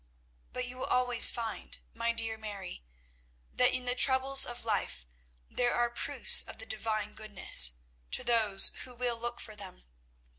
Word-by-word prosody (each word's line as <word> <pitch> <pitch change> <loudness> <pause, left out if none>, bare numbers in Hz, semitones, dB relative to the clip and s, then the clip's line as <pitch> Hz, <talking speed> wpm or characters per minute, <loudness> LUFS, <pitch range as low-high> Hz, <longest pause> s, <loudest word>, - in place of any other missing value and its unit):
"But 250 0 -6
you 250 +1 -11
will - - -6
always 250 -2 +5
find, 225 -2 -6 0.2
my 230 0 -4
dear 225 -1 -4
Mary, 200 - -11 0.7
that - - +1
in 255 0 -5
the 245 - -2
troubles 265 +1 +4
of 240 -1 -9
life 205 - -5 0.4
there 245 -1 -3
are 240 0 -2
proofs 240 - +2
of - - -13
the - - -13
Divine 215 -1 -6
goodness, 185 - +5 0.4
to - - -7
those 220 -5 +1
who 250 -1 -11
will 240 -1 -5
look 240 +1 -8
for 215 - -11
them. - - -13
230 Hz, 160 wpm, -28 LUFS, 215-245 Hz, 0.7 s, always